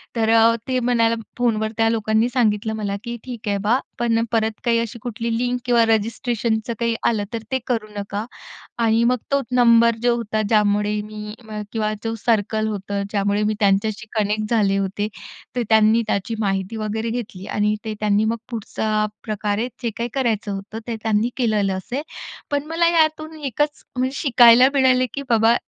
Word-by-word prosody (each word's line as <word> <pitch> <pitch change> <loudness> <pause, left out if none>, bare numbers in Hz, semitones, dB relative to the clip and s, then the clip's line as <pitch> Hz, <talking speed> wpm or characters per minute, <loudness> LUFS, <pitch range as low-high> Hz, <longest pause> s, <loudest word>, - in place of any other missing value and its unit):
तर 225 -1 +1
अ, 230 0 +5
ते 255 -1 +1
म्हणायला 230 -2 +2 0.2
फोन 240 -3 +2
वर 215 - -1
त्या 225 0 +3
लोकांनी 220 0 +1
सांगितलं 220 -3 +1
मला 205 -2 -2
की 235 -1 -4
ठीक 240 -4 -8
आहे 200 -1 +1
बा, 225 +4 +3 0.2
पण 230 -1 +2
परत 225 -1 +1
काही 230 -1 +3
अशी 230 0 -4
कुठली 230 0 -4
लिंक 245 +1 -1
किंवा 240 -1 +4
रजिस्ट्रेशनचं 225 +1 0
काही 230 -1 +1
आलं 215 -3 +1
तर 225 -1 -3
ते 260 - +1
करू 225 -4 -1
नका. 205 +1 -4 0.5
आणि 230 0 +3
मग 250 +1 +3
तो 280 - +3
नंबर 235 -1 +5
जो 240 -1 +3
होता 220 -2 -2
ज्यामुळे 210 -1 +2
मी 210 0 -8
म 215 -1 -5
किंवा 215 -1 -1
जो 225 0 -2
सर्कल 220 -1 +1
होतं, 200 -1 -3
ज्यामुळे 205 0 +1
मी 215 - +1
त्यांच्याशी 210 +2 +1
कनेक्ट 210 0 0
झाले 200 -4 +3
होते, 195 +1 -1 0.5
तर 245 - 0
त्यांनी 220 +1 +5
त्याची 205 +2 -1
माहिती 195 0 -1
वगैरे 220 +1 -2
घेतली 225 -5 -5
आणि 210 0 +1
ते 220 - -3
त्यांनी 210 0 +2
मग 230 +1 0
पुढचा 215 -1 -1 0.2
प्रकारे 215 +1 -2 0.2
जे 235 - +1
काही 235 +1 -2
करायचं 225 -6 0
होतं 200 +3 -6
ते 235 - -2
त्यांनी 220 +2 +1
केलेलं 210 -5 +1
असेल. 245 +9 -4 0.5
पण 285 0 0
मला 335 +1 +2
यातून 315 -1 +1
एकच 295 +2 -2
म्हणजे 260 +2 0
शिकायला 245 -1 +7
मिळाले 255 -1 +4
की 280 - -4
बाबा 230 +1 +4
225 Hz, 180 wpm, -21 LUFS, 210-240 Hz, 0.5 s, शिकायला